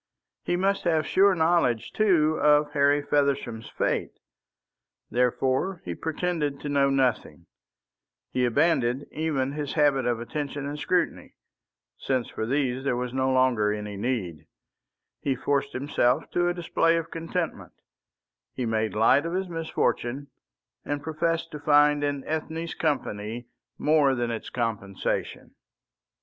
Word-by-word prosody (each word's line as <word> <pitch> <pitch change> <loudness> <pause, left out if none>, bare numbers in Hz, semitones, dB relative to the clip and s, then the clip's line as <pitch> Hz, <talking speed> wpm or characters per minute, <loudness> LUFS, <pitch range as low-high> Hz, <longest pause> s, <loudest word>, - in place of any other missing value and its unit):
He 175 - -1
must 195 +2 0
have 160 -2 +2
sure 195 +2 +4
knowledge, 160 -9 +1
too, 160 -7 +3
of 150 0 +4
Harry 145 0 +3
Feversham's 140 -6 0
fate. - - -2 0.9
Therefore 130 +8 0
he - - -3
pretended 160 -3 -2
to 145 - -4
know 140 -1 +3
nothing; 130 -3 0 0.9
he 125 - 0
abandoned 130 0 +2
even 150 -4 -1
his 145 -1 -4
habit 140 -4 +2
of 120 -2 0
attention 145 +3 -4
and 145 +1 -5
scrutiny, 180 +3 -1 0.6
since 130 -3 -1
for 110 - -4
these 130 -1 0
there 135 -3 0
was 125 0 -3
no 130 0 +1
longer 130 -5 +3
any 105 -1 -4
need; 100 - -3 0.7
he 135 -2 -1
forced 140 +1 -1
himself 130 +1 0
to 175 0 +1
a 175 - +1
display 165 -1 +2
of 165 0 -4
contentment; 165 - -4 0.8
he 125 - -2
made 110 -1 -1
light 125 +8 +4
of 170 - -4
his 190 +1 -1
misfortune, 145 -5 -2 0.5
and 145 0 -3
professed 165 +1 -1
to 150 - -6
find 145 0 +4
in 145 -1 -1
Ethne's 160 +1 -3
company 120 -6 -2 0.3
more 150 -3 +3
than 120 -1 -1
its 115 - -5
compensation. 110 -5 -3
140 Hz, 135 wpm, -26 LUFS, 125-160 Hz, 0.9 s, sure